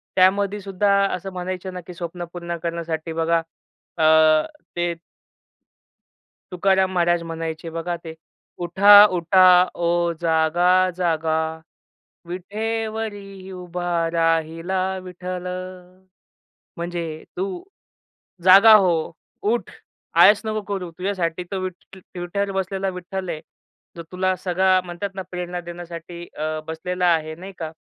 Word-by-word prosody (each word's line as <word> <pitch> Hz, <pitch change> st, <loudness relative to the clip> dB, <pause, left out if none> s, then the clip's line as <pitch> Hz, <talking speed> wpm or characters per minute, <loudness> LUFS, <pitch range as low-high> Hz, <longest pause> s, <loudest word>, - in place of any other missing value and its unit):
त्यामध्ये 200 Hz, +2 st, +3 dB
सुद्धा 200 Hz, +1 st, 0 dB, 0.2 s
असं 190 Hz, +2 st, -7 dB
म्हणायचं 185 Hz, +1 st, -5 dB
ना, 180 Hz, -, -6 dB
की 175 Hz, +1 st, -11 dB
स्वप्न 175 Hz, 0 st, -6 dB
पूर्ण 170 Hz, -1 st, -5 dB
करण्यासाठी 165 Hz, -1 st, -3 dB
बघा 165 Hz, +1 st, +1 dB, 0.6 s
अ 160 Hz, -, +1 dB, 0.7 s
ते 175 Hz, 0 st, 0 dB, 1.6 s
तुकाराम 190 Hz, +1 st, +2 dB
महाराज 175 Hz, -1 st, +2 dB
म्हणायचे, 165 Hz, 0 st, -5 dB
बघा 165 Hz, +2 st, -3 dB
ते 160 Hz, -, -7 dB, 0.5 s
उठा, 205 Hz, +4 st, +8 dB
उठा 185 Hz, 0 st, +4 dB, 0.3 s
ओ 170 Hz, -, -2 dB, 0.3 s
जागा 165 Hz, +2 st, +2 dB, 0.3 s
जागा 160 Hz, -3 st, 0 dB, 0.9 s
विठेवरी 205 Hz, 0 st, -5 dB
उभा 180 Hz, -1 st, -5 dB, 0.2 s
राहिला 165 Hz, +2 st, 0 dB, 0.2 s
विठ्ठल. 180 Hz, 0 st, -6 dB, 1.3 s
म्हणजे 170 Hz, 0 st, -3 dB, 0.3 s
तू 375 Hz, -, 0 dB, 1.0 s
जागा 195 Hz, +4 st, +9 dB
हो, 185 Hz, -4 st, +4 dB, 0.6 s
उठ, 235 Hz, -, -1 dB, 0.4 s
आळस 205 Hz, 0 st, +6 dB
नको 215 Hz, 0 st, -2 dB
करू. 185 Hz, -3 st, -4 dB
तुझ्यासाठी 180 Hz, -2 st, -2 dB
तर 195 Hz, -, -2 dB, 0.6 s
विटेवर 190 Hz, +3 st, -2 dB
बसलेला 195 Hz, 0 st, -2 dB
विठ्ठल 185 Hz, 0 st, -6 dB
आहे, 155 Hz, -2 st, -4 dB, 0.5 s
जो 170 Hz, -, -7 dB
तुला 185 Hz, 0 st, 0 dB
सगळा 185 Hz, +1 st, +2 dB
म्हणतात 175 Hz, +3 st, -5 dB
ना, 190 Hz, -, -4 dB
प्रेरणा 180 Hz, 0 st, -4 dB
देण्यासाठी 175 Hz, 0 st, -9 dB
अ 155 Hz, +1 st, -2 dB
बसलेला 180 Hz, +3 st, -2 dB
आहे 155 Hz, -1 st, -2 dB
नाही 190 Hz, +3 st, -9 dB
का. 160 Hz, -2 st, -4 dB
180 Hz, 110 wpm, -22 LUFS, 170-190 Hz, 1.6 s, जागा